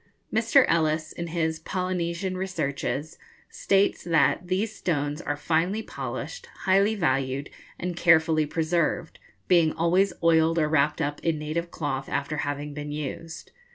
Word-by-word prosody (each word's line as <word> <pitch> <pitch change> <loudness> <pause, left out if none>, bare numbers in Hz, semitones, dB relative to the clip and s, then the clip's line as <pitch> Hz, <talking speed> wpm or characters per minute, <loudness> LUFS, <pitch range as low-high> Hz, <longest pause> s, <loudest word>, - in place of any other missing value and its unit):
Mr. 230 +4 +5
Ellis, 155 -1 +1
in 170 - -5
his 160 -1 -1
'Polynesian 180 +1 -2
Researches,' 155 -4 -3 0.3
states 195 0 +1
that 165 +1 +2
'these 200 +4 -1
stones 145 -4 -1
are 145 -3 -3
finely 170 +8 0
polished, - - -6
highly 195 +3 +3
valued, 135 -5 -1 0.3
and 180 -1 -3
carefully 160 -2 +4
preserved, 165 +1 -1 0.3
being 170 -4 +4
always 180 +4 +2
oiled 165 0 +4
or 155 -2 +3
wrapped 150 0 +2
up 145 -1 -2
in 165 -2 0
native 155 +3 -3
cloth 140 -5 -3
after 145 +2 -2
having 145 0 -3
been 145 0 -6
used. 150 +2 -6
165 Hz, 135 wpm, -26 LUFS, 150-180 Hz, 0.3 s, Mr